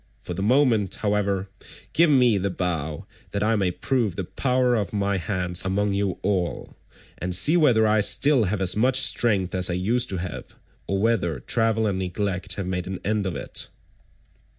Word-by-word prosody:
For 90 Hz, -, -7 dB
the 90 Hz, -, -5 dB
moment, 115 Hz, -3 st, +2 dB
however, 100 Hz, -2 st, -1 dB, 0.5 s
give 170 Hz, 0 st, +4 dB
me 125 Hz, -7 st, +4 dB
the 100 Hz, +1 st, -1 dB
bow 80 Hz, -5 st, -3 dB, 0.3 s
that 100 Hz, 0 st, -1 dB
I 115 Hz, +1 st, +2 dB
may 95 Hz, -4 st, +1 dB
prove 110 Hz, 0 st, -1 dB
the 95 Hz, -, -3 dB
power 125 Hz, +5 st, 0 dB
of 105 Hz, -4 st, -1 dB
my 100 Hz, -1 st, -1 dB
hands 90 Hz, 0 st, -1 dB
among 100 Hz, +2 st, 0 dB
you 100 Hz, -2 st, -1 dB
all, 95 Hz, -3 st, -2 dB, 0.4 s
and 90 Hz, 0 st, -1 dB
see 150 Hz, -, +4 dB
whether 125 Hz, -10 st, +4 dB
I 110 Hz, 0 st, +3 dB
still 130 Hz, +4 st, +4 dB
have 100 Hz, +1 st, -2 dB
as 95 Hz, -1 st, +2 dB
much 125 Hz, +4 st, +2 dB
strength 105 Hz, -8 st, +1 dB
as 90 Hz, -1 st, 0 dB
I -, -, -1 dB
used 115 Hz, +7 st, 0 dB
to 95 Hz, -, -3 dB
have, 90 Hz, -2 st, -7 dB, 0.3 s
or 95 Hz, 0 st, -1 dB
whether 100 Hz, -, 0 dB
travel 115 Hz, -, 0 dB
and 100 Hz, -3 st, -1 dB
neglect 95 Hz, 0 st, -2 dB
have 100 Hz, -, -4 dB
made 90 Hz, -1 st, -3 dB
an 95 Hz, -1 st, -5 dB
end 105 Hz, -1 st, 0 dB
of 90 Hz, -, -4 dB
it." -, -, -5 dB
100 Hz, 185 wpm, -24 LUFS, 90-115 Hz, 0.5 s, give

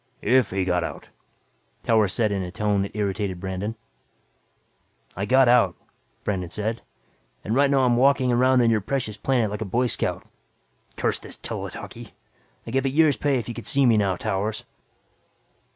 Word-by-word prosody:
"If 125 Hz, +2 st, +3 dB
he 95 Hz, 0 st, -1 dB
got 90 Hz, -1 st, +1 dB
out," -, -, -7 dB, 0.7 s
Towers 110 Hz, -4 st, +3 dB
said 110 Hz, -3 st, +1 dB
in 100 Hz, -1 st, -1 dB
a 90 Hz, -, -4 dB
tone 105 Hz, +1 st, 0 dB
that 100 Hz, -, -5 dB
irritated 100 Hz, -3 st, -2 dB
Brandon. 95 Hz, +4 st, -4 dB, 1.4 s
"I 95 Hz, -, -2 dB
got 130 Hz, +1 st, +5 dB
out," 120 Hz, -8 st, +4 dB, 0.5 s
Brandon 90 Hz, -4 st, -2 dB
said. 110 Hz, +5 st, -3 dB, 0.6 s
"And 110 Hz, -, -2 dB
right 140 Hz, +3 st, +4 dB
now 140 Hz, -1 st, +3 dB
I'm 120 Hz, -1 st, +3 dB
walking 135 Hz, 0 st, +3 dB
around 125 Hz, 0 st, +4 dB
your 110 Hz, -2 st, +2 dB
precious 115 Hz, -1 st, -2 dB
planet 115 Hz, -1 st, 0 dB
like 105 Hz, -, -5 dB
a -, -, -1 dB
boy 120 Hz, +6 st, 0 dB
scout. 120 Hz, -, -2 dB, 0.7 s
Damn -, -, +1 dB
this -, -, -10 dB
tele -, -, -4 dB
talkie! -, -, -10 dB, 0.5 s
I'd 115 Hz, -, -7 dB
give 135 Hz, 0 st, +1 dB
a -, -, +2 dB
year's 150 Hz, 0 st, +3 dB
pay 145 Hz, -2 st, +1 dB
if 120 Hz, -, -4 dB
you 120 Hz, -, -4 dB
could 120 Hz, -, -8 dB
see 140 Hz, -2 st, +3 dB
me 120 Hz, -2 st, +5 dB
now, 100 Hz, -3 st, +2 dB
Towers." 105 Hz, +2 st, -3 dB
110 Hz, 175 wpm, -24 LUFS, 100-130 Hz, 1.4 s, got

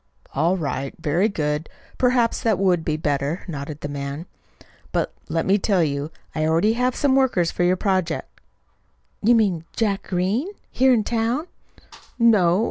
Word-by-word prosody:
"All 165 Hz, +7 st, +2 dB
right. 140 Hz, -4 st, -3 dB
Very 175 Hz, +8 st, +1 dB
good. 150 Hz, -4 st, -2 dB, 0.3 s
Perhaps 245 Hz, -2 st, +2 dB
that 220 Hz, -4 st, +2 dB
would 180 Hz, -3 st, +2 dB
be 155 Hz, -1 st, -1 dB
better," 145 Hz, +2 st, -1 dB
nodded 145 Hz, -2 st, -6 dB
the -, -, -3 dB
man. 140 Hz, +2 st, -5 dB, 0.7 s
"But, -, -, -1 dB, 0.2 s
let 165 Hz, +1 st, 0 dB
me 200 Hz, +2 st, +3 dB
tell 190 Hz, -3 st, +2 dB
you, 145 Hz, 0 st, -2 dB, 0.2 s
I 155 Hz, -, -1 dB
already 165 Hz, +8 st, +3 dB
have 250 Hz, +1 st, 0 dB
some 275 Hz, -2 st, +2 dB
workers 245 Hz, -11 st, +2 dB
for -, -, -4 dB
your 180 Hz, +1 st, +3 dB
project." 185 Hz, -5 st, -2 dB, 0.8 s
"You 235 Hz, +3 st, +5 dB
mean 195 Hz, -8 st, +2 dB
Jack 205 Hz, -3 st, 0 dB
Green, 190 Hz, -, -1 dB, 0.2 s
here 260 Hz, +1 st, +4 dB
in 230 Hz, -4 st, +3 dB
town?" 235 Hz, +7 st, -1 dB, 0.7 s
"No. 205 Hz, -7 st, +4 dB
180 Hz, 155 wpm, -23 LUFS, 155-225 Hz, 0.8 s, You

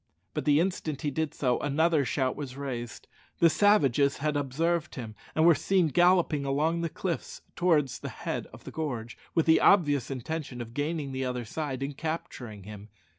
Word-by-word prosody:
But -, -, -3 dB
the 145 Hz, 0 st, +5 dB
instant 165 Hz, -5 st, -2 dB
he 145 Hz, -, 0 dB
did 160 Hz, +1 st, -2 dB
so 125 Hz, -3 st, +1 dB
another 155 Hz, +2 st, +2 dB
shout 130 Hz, 0 st, 0 dB
was 135 Hz, -3 st, -7 dB
raised. 125 Hz, -4 st, -5 dB, 0.3 s
The 165 Hz, -1 st, +5 dB
savages 145 Hz, -, +3 dB
had 150 Hz, +1 st, -1 dB
observed 155 Hz, +4 st, -1 dB
him, 115 Hz, -4 st, -6 dB, 0.2 s
and 160 Hz, -, +4 dB
were 170 Hz, -, +8 dB
seen 180 Hz, +1 st, +2 dB
galloping 175 Hz, -2 st, +3 dB
along 150 Hz, +5 st, 0 dB
the 170 Hz, -, -1 dB
cliffs 175 Hz, +2 st, -4 dB
towards 155 Hz, -7 st, +2 dB
the -, -, -5 dB
head -, -, -4 dB
of -, -, -14 dB
the -, -, -8 dB
gorge, 120 Hz, -8 st, -4 dB, 0.2 s
with 165 Hz, -, +3 dB
the 160 Hz, -, +5 dB
obvious 145 Hz, -, +4 dB
intention 135 Hz, 0 st, -4 dB
of 115 Hz, -1 st, -7 dB
gaining 145 Hz, 0 st, -2 dB
the 130 Hz, 0 st, -2 dB
other 125 Hz, -1 st, -3 dB
side 135 Hz, +1 st, -4 dB
and 140 Hz, +1 st, -4 dB
capturing 145 Hz, -, -5 dB
him. 105 Hz, +1 st, -10 dB
145 Hz, 180 wpm, -28 LUFS, 130-165 Hz, 0.3 s, were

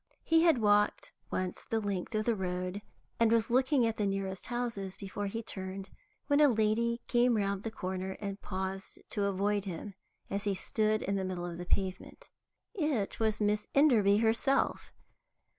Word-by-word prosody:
He 325 Hz, 0 st, +4 dB
had 330 Hz, -5 st, +5 dB
walked 210 Hz, -2 st, +2 dB, 0.2 s
once 185 Hz, -1 st, -3 dB
the 225 Hz, -, -1 dB
length 200 Hz, 0 st, -3 dB
of 215 Hz, 0 st, 0 dB
the 235 Hz, -, +3 dB
road, 185 Hz, 0 st, -3 dB, 0.4 s
and 230 Hz, -1 st, +4 dB
was 230 Hz, 0 st, +2 dB
looking 260 Hz, 0 st, +3 dB
at 225 Hz, -1 st, -1 dB
the 210 Hz, -, +1 dB
nearest 195 Hz, -1 st, -3 dB
houses 230 Hz, -6 st, -3 dB
before 200 Hz, +1 st, -4 dB
he 225 Hz, +3 st, -4 dB
turned, 190 Hz, -1 st, -6 dB, 0.3 s
when 285 Hz, 0 st, +3 dB
a 295 Hz, -, +8 dB
lady 235 Hz, +1 st, +1 dB
came 240 Hz, -1 st, +3 dB
round 200 Hz, -1 st, 0 dB
the 225 Hz, -, -3 dB
corner 190 Hz, -2 st, -4 dB
and 200 Hz, -1 st, -5 dB
paused 190 Hz, 0 st, -4 dB
to 205 Hz, -2 st, 0 dB
avoid 200 Hz, +1 st, 0 dB
him, 195 Hz, +2 st, -6 dB, 0.3 s
as 200 Hz, +1 st, -2 dB
he 200 Hz, -1 st, +1 dB
stood 215 Hz, +3 st, 0 dB
in 200 Hz, +1 st, 0 dB
the 190 Hz, -, -1 dB
middle 185 Hz, -2 st, -3 dB
of 170 Hz, -1 st, -6 dB
the 175 Hz, -, -6 dB
pavement. 190 Hz, -1 st, -2 dB, 0.4 s
It 300 Hz, -, -1 dB
was 220 Hz, -1 st, +1 dB
Miss 210 Hz, 0 st, +1 dB
Enderby 225 Hz, -9 st, +5 dB
herself. 230 Hz, +5 st, +1 dB
205 Hz, 175 wpm, -31 LUFS, 190-230 Hz, 0.4 s, a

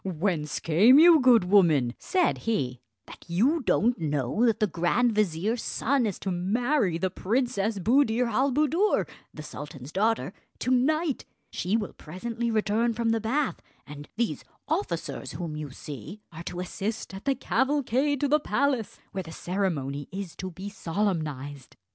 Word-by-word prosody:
"Whence 170 Hz, -4 st, -1 dB
came 205 Hz, -, +6 dB
you, 330 Hz, +1 st, +8 dB
good 250 Hz, -6 st, +6 dB
woman," 165 Hz, -10 st, +4 dB
said 365 Hz, -2 st, +1 dB
he, 130 Hz, -, -1 dB, 0.2 s
"that -, -, -13 dB
you 245 Hz, -, +2 dB
don't 240 Hz, 0 st, +2 dB
know 145 Hz, -, 0 dB
that 225 Hz, -, +1 dB
the 215 Hz, -, +3 dB
grand 195 Hz, +7 st, +1 dB
vizier's 210 Hz, +3 st, 0 dB
son 260 Hz, -1 st, 0 dB
is 200 Hz, -, -3 dB
to 195 Hz, -, -4 dB
marry 200 Hz, -, +1 dB
the 185 Hz, +1 st, -1 dB
Princess 215 Hz, 0 st, -1 dB
Buddir 235 Hz, +3 st, +3 dB
al 260 Hz, +4 st, +1 dB
Buddoor, 305 Hz, +9 st, +2 dB, 0.2 s
the 155 Hz, -, -9 dB
sultan's 145 Hz, -2 st, -9 dB
daughter, 215 Hz, 0 st, 0 dB, 0.2 s
to 255 Hz, -, -2 dB
night? 295 Hz, +4 st, +1 dB, 0.3 s
She 195 Hz, +5 st, 0 dB
will 210 Hz, -3 st, -4 dB
presently 230 Hz, +8 st, -4 dB
return 225 Hz, +1 st, +1 dB
from 230 Hz, 0 st, 0 dB
the 225 Hz, 0 st, +1 dB
bath; 265 Hz, +6 st, -1 dB, 0.2 s
and 145 Hz, 0 st, -10 dB
these 235 Hz, +1 st, -1 dB, 0.2 s
officers 405 Hz, -, -3 dB
whom 170 Hz, -4 st, -5 dB
you 150 Hz, -1 st, -5 dB
see 140 Hz, -, -9 dB
are 165 Hz, 0 st, -9 dB
to 180 Hz, -, -5 dB
assist 200 Hz, +4 st, -4 dB
at 195 Hz, +5 st, -9 dB
the 275 Hz, -1 st, +2 dB
cavalcade 275 Hz, 0 st, 0 dB
to 290 Hz, -, +2 dB
the 300 Hz, +2 st, +3 dB
palace, 275 Hz, -6 st, -1 dB
where 190 Hz, -, -3 dB
the 165 Hz, -3 st, -10 dB
ceremony 160 Hz, -7 st, -2 dB
is 190 Hz, -3 st, -6 dB
to 185 Hz, -, -5 dB
be 185 Hz, +3 st, -8 dB
solemnised." 155 Hz, -, -3 dB
210 Hz, 160 wpm, -27 LUFS, 165-245 Hz, 0.3 s, you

